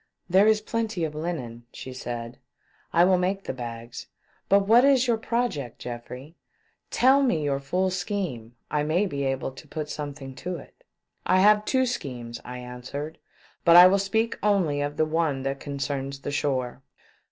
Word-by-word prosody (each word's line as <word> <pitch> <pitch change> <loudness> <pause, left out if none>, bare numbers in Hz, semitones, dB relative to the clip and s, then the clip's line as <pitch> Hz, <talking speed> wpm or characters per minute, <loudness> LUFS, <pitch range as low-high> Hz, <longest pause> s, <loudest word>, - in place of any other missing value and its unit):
" - - -47
There 195 +3 +6
is 215 -1 +4
plenty 220 -5 -2
of 155 -2 -2
linen," 130 -8 -5
said 120 -2 -6
she. - - -33 0.2
" - - -37
I - - +8
will 185 -1 +4
make 195 +2 -1
the - - -4
bags. 120 -1 -7 0.4
But 200 +1 +6
what 235 +3 +7
is 270 -2 +5
your 235 -2 +2
pro 235 +2 0
ject, 140 - -7
Geoffrey? 125 +5 -8 0.5
Tell 265 +3 +4
me 205 - +1
your 140 -1 0
full 180 +7 0
scheme 180 - -4
— - - -47
I 150 0 +1
may 160 +7 +1
be 140 -7 -3
able 135 0 -2
to 140 +4 -13
put 150 0 -5
something 145 -2 -6
to 180 +7 -4
it." 155 - -13 0.2
" - - -48
I 185 - +4
have 210 +1 +5
two 260 -1 +2
schemes," 125 - -5
I 125 +1 -7
answered: 125 +5 -7 0.2
" - - -31
but 170 - +6
I 175 +1 +11
will 195 +2 +5
speak 220 +4 0
only 185 -9 +2
of 145 0 -3
the 155 - +3
one 155 -4 0
that 135 0 -2
concerns 140 -1 -4
the 145 - -4
shore. 130 -3 -1
150 Hz, 195 wpm, -26 LUFS, 135-195 Hz, 0.5 s, I